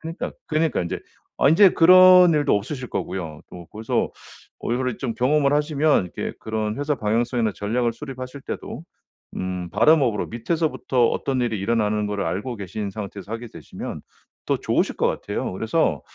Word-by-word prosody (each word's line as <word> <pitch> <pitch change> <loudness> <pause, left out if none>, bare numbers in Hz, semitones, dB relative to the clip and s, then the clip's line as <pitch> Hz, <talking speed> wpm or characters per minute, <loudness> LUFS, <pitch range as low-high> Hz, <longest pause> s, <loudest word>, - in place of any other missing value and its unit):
그니까 165 +1 -5 0.2
그러니까 155 0 +1
인제 85 - -4 0.4
아 - - +4
인제 185 +6 +7
그런 180 0 +7
일도 150 -1 +2
없으실 125 +5 -5
거고요. 80 -5 -4
또 85 -1 -10
그래서 110 +1 -1 0.5
어 - - -2
이거를 125 -1 -1
좀 120 -4 -3
경험을 140 +3 +2
하시면 150 - +2
이렇게 - - -3
그런 110 -1 -3
회사 145 0 -1
방향성이나 115 0 0
전략을 115 +3 -1
수립하실 130 0 -8
때도 - - -6 0.5
음 90 -1 -4
바텀업으로 120 - +3
밑에서부터 130 -1 0
어떤 130 -2 -1
일이 115 -3 -1
일어나는 105 0 0
거를 105 -1 -2
알고 105 +8 -3
계신 100 +1 -5
상태에서 100 -1 -8
하게 115 +1 -5
되시면 - - -8 0.5
더 - - +1
좋으실 - - 0
것 - - +1
같아요. - - -3
그래서 110 - 0
120 Hz, 385 characters per minute, -23 LUFS, 105-150 Hz, 0.5 s, 인제